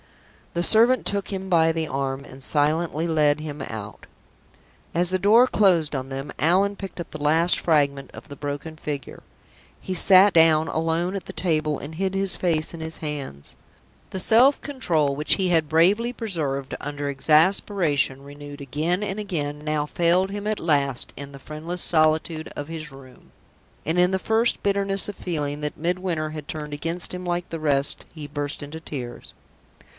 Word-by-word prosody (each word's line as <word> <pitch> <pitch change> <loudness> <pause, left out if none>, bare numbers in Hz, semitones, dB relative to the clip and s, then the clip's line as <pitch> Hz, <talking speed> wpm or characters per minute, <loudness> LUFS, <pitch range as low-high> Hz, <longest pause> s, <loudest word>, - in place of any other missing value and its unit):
The 170 - 0
servant 235 +6 +4
took 200 -1 0
him 190 -1 -5
by 165 -3 +3
the 160 -1 -2
arm, 135 0 -3
and 130 +1 -11
silently 155 +3 +1
led 150 -2 +2
him 150 -2 -7
out. 110 -4 -8 0.9
As 175 +1 +1
the 185 - 0
door 225 +6 +5
closed 175 - +2
on 130 0 -4
them, 135 +1 -6
Allan 190 +5 +2
picked 195 -2 -9
up 170 - -7
the 155 - -8
last 165 +4 +4
fragment 140 -4 0
of - - -12
the 145 - -9
broken 145 +3 -6
figure. 145 -3 -6 0.6
He 190 - -5
sat 185 +2 +6
down 160 -1 +5
alone 165 +4 -1
at 195 - -5
the - - -8
table, 155 -4 0
and 155 +3 -9
hid 190 +2 -2
his 195 -1 +6
face 165 -3 -1
in 165 - -8
his 160 0 -5
hands. 140 - -6 0.5
The 190 - -5
self 245 +9 +5
control 160 - 0
which 150 +2 +3
he 190 -2 -1
had 160 -3 +1
bravely 195 +9 +3
preserved 155 - -3
under 145 0 -5
exasperation 150 -1 +2
renewed 145 0 -11
again 155 +8 -2
and 200 0 -3
again 150 -8 -4
now 150 -1 -1
failed 175 +4 +1
him 205 +1 -5
at 215 -1 -1
last 140 -5 0
in 140 +1 -9
the 140 - -11
friendless 160 +5 -2
solitude 155 0 +3
of 145 - -5
his 155 -2 -7
room, 135 -1 -16 0.5
and, 165 +3 0
in 180 +1 +4
the 190 - 0
first 225 +4 +1
bitterness 195 -1 +2
of 205 - -6
feeling 150 -5 -4
that 150 0 -4
Midwinter 170 -2 -2
had 155 -2 -8
turned 150 -1 -6
against 165 +5 -2
him 180 0 -6
like 175 0 -2
the 165 - -4
rest, 145 -2 +2
he 155 -3 -8
burst 145 -1 -5
into 150 +3 -8
tears. 130 -6 -8
160 Hz, 175 wpm, -23 LUFS, 145-185 Hz, 0.9 s, sat